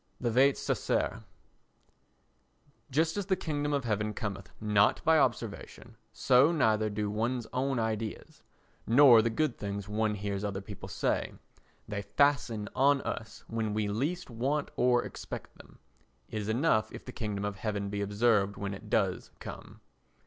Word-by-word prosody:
The 120 - 0
Vates 135 +4 +4
Sacer - - -1 1.7
Just 160 +6 +1
as 200 -2 -2
the 190 - +3
kingdom 145 -4 -2
of 140 -2 0
heaven 105 -1 -1
cometh 100 -4 -5
not 105 -1 +3
by 160 -1 +5
observation, 115 -5 -2 0.2
so 130 +5 +4
neither 110 -9 +2
do 105 0 -2
one's 115 +3 -1
own 135 +1 0
ideas, 110 -1 -3 0.5
nor 120 -1 +8
the 115 - +1
good 130 +3 -1
things 100 0 -4
one 105 0 0
hears 100 -1 -3
other 100 -2 -2
people 100 0 -9
say; - - -1 0.5
they 100 -1 -3
fasten 115 -1 +1
on 140 +1 +4
us 110 - -5
when 110 -2 -2
we 105 -1 0
least 140 - -2
want 135 +6 -1
or 125 0 +3
expect - - -8
them. - - -16 0.5
It 110 - -2
is 105 - -4
enough 110 -2 +2
if - - -10
the 125 - -7
kingdom 105 -4 -3
of 100 -1 -3
heaven 100 -1 -2
be 100 0 -2
observed 100 -1 +2
when 100 0 -3
it 100 - -10
does - - 0
come. - - -10
110 Hz, 155 wpm, -30 LUFS, 105-130 Hz, 1.7 s, nor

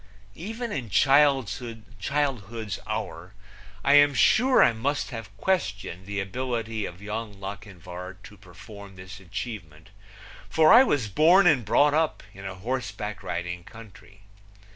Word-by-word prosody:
Even 225 - -6
in 130 - -4
childhood's 120 -3 0
hour 90 +5 -5 0.5
I 140 - +4
am 145 -1 +6
sure 255 - +5
I - - +4
must 140 +7 -2
have 110 -4 -8
questioned 100 - -2
the 100 0 -3
ability 115 +1 -3
of 90 +3 -11
Young 105 -1 -6
Lochinvar 95 -2 -8
to 105 - -13
perform 100 +1 -13
this 95 +2 -11
achievement, 90 -4 -8 0.6
for 160 +2 +5
I 235 - +10
was 145 - 0
born 165 - +5
and 150 -8 +4
brought 145 +8 +3
up 160 0 0
in 95 0 -11
a 95 -1 -5
horseback 105 -2 -4
riding 90 -1 -5
country. 105 -1 -15
110 Hz, 130 wpm, -26 LUFS, 95-135 Hz, 0.6 s, I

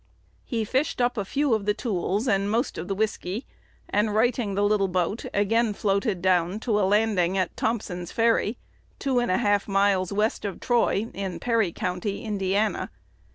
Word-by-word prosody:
He 230 -4 -2
fished 265 +7 0
up 245 0 +2
a 205 - -1
few 280 +6 0
of 210 -2 -1
the 210 - +2
tools 205 +1 -1
"and 200 -2 +2
most 230 +5 -1
of 175 - -5
the 195 - -2
whiskey," 210 +1 -2 0.4
and, 210 +1 +1
righting 225 -2 +1
the 200 - +1
little 205 -1 +2
boat, 185 +4 -1
again 215 +2 +1
floated 200 -2 0
down 185 +1 +2
to 220 -4 +1
a 190 -2 +2
landing 200 -4 +2
at 185 -3 -1
Thompson's 180 -6 -2
Ferry, 230 -1 +2 0.4
two 265 -3 +1
and 240 - 0
a 185 - +3
half 205 -3 +1
miles 195 -2 +2
west 210 +2 0
of 200 -3 -4
Troy, 230 -3 +1
in 190 -2 -4
Perry 230 -7 +1
County, 185 +1 -3
Indiana. 205 0 0
205 Hz, 175 wpm, -25 LUFS, 195-225 Hz, 0.4 s, a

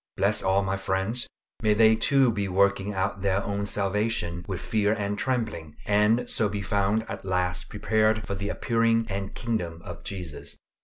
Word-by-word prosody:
Bless - - +2
all 95 +1 +2
my 95 0 -1
friends; 95 +5 -1 0.3
may 105 -2 +3
they 110 0 +6
too 135 +2 +3
be 100 -2 -1
working 100 +1 +2
out 100 0 -2
their 100 0 +1
own 100 0 -2
salvation 100 -4 -1
with 95 -3 -3
fear 105 0 +1
and 105 -1 -2
trembling, 110 - -2
and 105 +4 +3
so 105 - +1
be 100 0 -3
found 100 +2 +1
at 100 - -6
last 90 -3 -1
prepared 110 0 +1
for 100 - -3
the 100 +1 -3
appearing 115 0 +1
and 100 0 -4
kingdom 90 -9 -2
of 90 -4 -9
Jesus. 90 -6 -6
100 Hz, 170 wpm, -26 LUFS, 95-110 Hz, 0.3 s, they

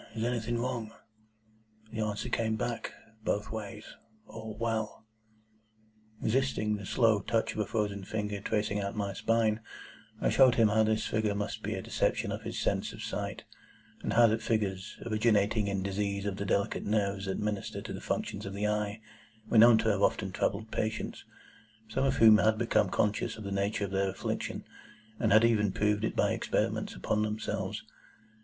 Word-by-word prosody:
Is 110 - -2
anything 120 -1 -1
wrong?' 115 -2 -3 1.0
The 110 - -5
answer 105 +2 -2
came 115 -2 0
back, 115 +1 -3 0.3
both 105 +2 -1
ways, 105 -1 -6 0.4
'All 110 -1 -8
well.'" 110 -2 -2 1.1
Resisting 110 -3 +1
the 100 -2 -8
slow 110 -4 +3
touch 115 +2 0
of - - -5
a 105 - 0
frozen 105 -2 -1
finger 105 0 -3
tracing 105 -1 0
out 100 +1 -3
my 100 -2 -2
spine, 110 0 +1 0.6
I - - +1
showed 130 -3 +6
him 115 -2 +5
how 105 - +1
that - - +4
this 110 0 +1
figure 110 -1 0
must 105 0 -3
be - - -2
a - - -5
deception - - 0
of - - -4
his - - -5
sense - - 0
of - - -8
sight; - - -4 0.6
and - - -2
how 120 0 +7
that 110 0 +2
figures, 100 -4 -1
originating 105 -2 +2
in 100 -1 -1
disease 100 0 -2
of 100 -2 -2
the 100 - -3
delicate 100 0 0
nerves 100 -2 0
that 95 - -1
minister 105 -2 -3
to - - -6
the - - -6
functions 100 - -3
of 100 - -5
the 100 +1 -1
eye, 105 0 -1 0.5
were 115 - +5
known 115 0 +8
to 110 - +1
have 100 -2 +1
often 105 -2 +1
troubled 110 +4 -1
patients, 110 0 -3 0.6
some 130 - 0
of 135 - +2
whom 110 -1 +8
had 110 +1 +3
become 115 +1 +2
conscious 105 +2 0
of 110 - -8
the 100 - -5
nature 100 +1 0
of 95 - -7
their 95 0 +1
affliction, 95 - -4 0.5
and - - +2
had 110 +2 +7
even 105 -4 +3
proved 105 +2 +1
it - - -1
by - - +2
experiments - - -1
upon 105 - 0
themselves. 105 -1 -2
105 Hz, 180 wpm, -30 LUFS, 100-110 Hz, 1.1 s, known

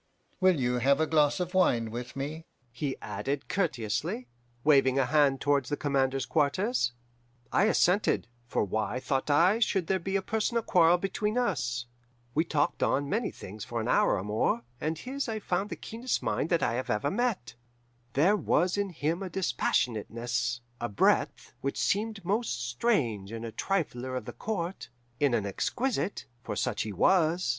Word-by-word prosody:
Will 185 -5 +4
you 125 -1 +1
have 140 +4 +3
a 160 - +3
glass 150 -1 +3
of 180 0 -3
wine 120 -12 +2
with 120 +2 -6
me?' 150 +4 -5 0.2
he 135 +2 -3
added 140 0 -3
courteously, 125 - -1 0.4
waving 135 -3 +4
a 135 - +3
hand 140 -1 +3
towards 145 0 +1
the 145 - -1
commander's 135 -2 0
quarters. 155 - +1 0.6
"I 200 - +4
assented, 200 - +2 0.2
for - - 0
why, 110 +4 -1
thought 135 +2 -1
I, 175 +9 +4
should 195 -6 +1
there 190 +2 +1
be 190 +3 -3
a 195 - +1
personal 225 +2 0
quarrel 175 -2 +5
between 210 +4 -2
us? 140 - 0 0.5
We 160 +5 +2
talked 150 -3 0
on 140 +1 +1
many 225 +4 0
things 105 +2 -9
for 120 +1 -4
an 110 - -2
hour - - +3
or 95 - -3
more, 110 +3 0 0.2
and 155 +1 -2
his 260 - -4
I 220 - -2
found 195 -1 -1
the - - -4
keenest 235 +3 -3
mind 160 - 0
that 170 -2 +2
ever 125 +3 -1
I - - +3
have 140 - -1
met. 230 - -1 0.6
There 170 +10 +4
was 185 0 +1
in 200 -1 0
him 165 +1 -2
a 190 - -4
dispassionateness, 120 - -1 0.2
a 120 - -2
breadth, 100 - +1
which 140 - -2
seemed 210 -1 -1
most 200 - -1
strange 120 - 0
in 115 0 -5
a 115 - -5
trifler 130 - -2
of - - -6
the - - -7
Court, 175 - -4 0.3
in 140 -4 +3
an 105 - 0
exquisite 215 - -2 0.2
for - - -5
such 120 -4 -1
he 110 - -3
was. 170 - +3
150 Hz, 175 wpm, -29 LUFS, 125-190 Hz, 0.6 s, quarrel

